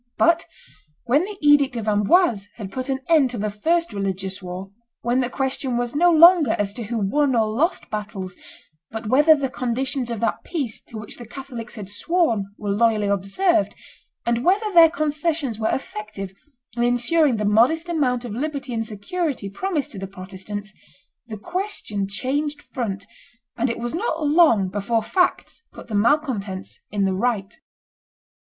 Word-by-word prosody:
But 335 Hz, 0 st, +3 dB, 0.6 s
when 285 Hz, +8 st, +2 dB
the 410 Hz, 0 st, -8 dB
edict 290 Hz, -3 st, +5 dB
of 225 Hz, -2 st, -4 dB
Amboise 210 Hz, -, +3 dB
had 200 Hz, -4 st, -7 dB
put 255 Hz, +3 st, -5 dB
an 265 Hz, 0 st, -1 dB
end 310 Hz, -6 st, +4 dB
to 245 Hz, -, -6 dB
the 210 Hz, 0 st, -2 dB
first 330 Hz, +7 st, 0 dB
religious 195 Hz, -1 st, -3 dB
war, 185 Hz, +1 st, -7 dB, 0.3 s
when 240 Hz, +2 st, +1 dB
the 250 Hz, -2 st, 0 dB
question 265 Hz, -1 st, -2 dB
was 240 Hz, 0 st, -2 dB
no 345 Hz, +5 st, +4 dB
longer 335 Hz, -5 st, +7 dB
as 200 Hz, -1 st, -1 dB
to 235 Hz, 0 st, -6 dB
who 235 Hz, +3 st, -3 dB
won 260 Hz, +7 st, +1 dB
or 220 Hz, -2 st, +3 dB
lost 275 Hz, -, -1 dB
battles, 200 Hz, -3 st, -5 dB, 0.5 s
but 220 Hz, +1 st, -6 dB
whether 300 Hz, +5 st, +6 dB
the 280 Hz, -2 st, -1 dB
conditions 255 Hz, +1 st, -2 dB
of 230 Hz, -2 st, -3 dB
that 230 Hz, -, -1 dB
peace 280 Hz, -10 st, -4 dB
to 225 Hz, -, -9 dB
which 210 Hz, -1 st, -8 dB
the 240 Hz, -, -10 dB
Catholics 245 Hz, -2 st, -8 dB
had 210 Hz, -4 st, -7 dB
sworn 225 Hz, -, 0 dB
were 205 Hz, -1 st, -3 dB
loyally 215 Hz, 0 st, +2 dB
observed, 200 Hz, -, +1 dB, 0.5 s
and 235 Hz, 0 st, 0 dB
whether 405 Hz, +4 st, +2 dB
their 335 Hz, -2 st, +8 dB
concessions 300 Hz, -5 st, -1 dB
were 220 Hz, -, +1 dB
effective 210 Hz, -6 st, -5 dB, 0.4 s
in 235 Hz, -, -1 dB
insuring 245 Hz, +4 st, +3 dB
the 210 Hz, -, -1 dB
modest 245 Hz, +11 st, +3 dB
amount 255 Hz, -8 st, 0 dB
of 235 Hz, -, -6 dB
liberty 275 Hz, 0 st, -3 dB
and 225 Hz, -1 st, -1 dB
security 225 Hz, -, -3 dB
promised 320 Hz, -, -2 dB
to 195 Hz, -, -6 dB
the 195 Hz, -, -5 dB
Protestants, 195 Hz, +2 st, -7 dB, 0.5 s
the 220 Hz, -2 st, -6 dB
question 345 Hz, -, -3 dB
changed 285 Hz, +8 st, -2 dB
front, 200 Hz, -6 st, -4 dB, 0.5 s
and 245 Hz, +2 st, 0 dB
it 230 Hz, -, -2 dB
was 240 Hz, 0 st, -4 dB
not 330 Hz, -4 st, -1 dB
long 290 Hz, -, +5 dB
before 205 Hz, +4 st, -1 dB
facts 360 Hz, -, 0 dB
put -, -, -12 dB
the -, -, -6 dB
malcontents 210 Hz, -5 st, 0 dB
in 200 Hz, -1 st, 0 dB
the 190 Hz, -, +1 dB
right. 205 Hz, -1 st, -1 dB
240 Hz, 170 wpm, -23 LUFS, 205-300 Hz, 0.6 s, their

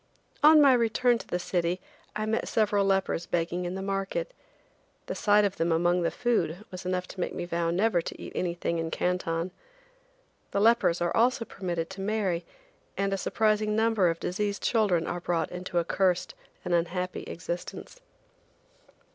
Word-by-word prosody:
On 305 Hz, +1 st, +8 dB
my 280 Hz, -3 st, +7 dB
return 240 Hz, 0 st, +2 dB
to -, -, -10 dB
the 180 Hz, -, -1 dB
city 175 Hz, 0 st, -1 dB, 0.4 s
I 215 Hz, +1 st, -1 dB
met 220 Hz, +1 st, -1 dB
several 210 Hz, -2 st, +2 dB
lepers 190 Hz, -3 st, 0 dB
begging 175 Hz, +1 st, -1 dB
in 175 Hz, +1 st, -3 dB
the 190 Hz, -, -4 dB
market. 195 Hz, -, -2 dB, 0.7 s
The -, -, -4 dB
sight 210 Hz, 0 st, +4 dB
of 200 Hz, -, -2 dB
them 165 Hz, +1 st, +1 dB
among 175 Hz, +2 st, +2 dB
the 170 Hz, -, +1 dB
food 215 Hz, -6 st, -1 dB
was 185 Hz, 0 st, -7 dB
enough 185 Hz, 0 st, -1 dB
to 195 Hz, -, -10 dB
make 175 Hz, -, -2 dB
me -, -, -3 dB
vow 170 Hz, -1 st, -1 dB
never 180 Hz, +1 st, +2 dB
to -, -, -7 dB
eat -, -, -8 dB
anything 170 Hz, -1 st, -2 dB
in 165 Hz, 0 st, -2 dB
Canton. 180 Hz, 0 st, -1 dB, 1.0 s
The -, -, -1 dB
lepers 210 Hz, -6 st, +3 dB
are 175 Hz, 0 st, 0 dB
also 240 Hz, 0 st, +2 dB
permitted 175 Hz, -4 st, -4 dB
to 190 Hz, 0 st, -7 dB
marry, 195 Hz, -4 st, 0 dB, 0.5 s
and 195 Hz, 0 st, 0 dB
a -, -, +2 dB
surprising 215 Hz, +2 st, +1 dB
number 220 Hz, -5 st, +3 dB
of 165 Hz, 0 st, -2 dB
diseased 200 Hz, +2 st, -2 dB
children 200 Hz, -8 st, +2 dB
are 175 Hz, -, -3 dB
brought 170 Hz, -1 st, -1 dB
into 180 Hz, 0 st, -4 dB
a 170 Hz, -, +2 dB
cursed 180 Hz, -1 st, +1 dB, 0.3 s
and 180 Hz, -, -1 dB
unhappy 180 Hz, +2 st, -1 dB
existence. 175 Hz, -, -6 dB
185 Hz, 170 wpm, -28 LUFS, 175-215 Hz, 1.0 s, On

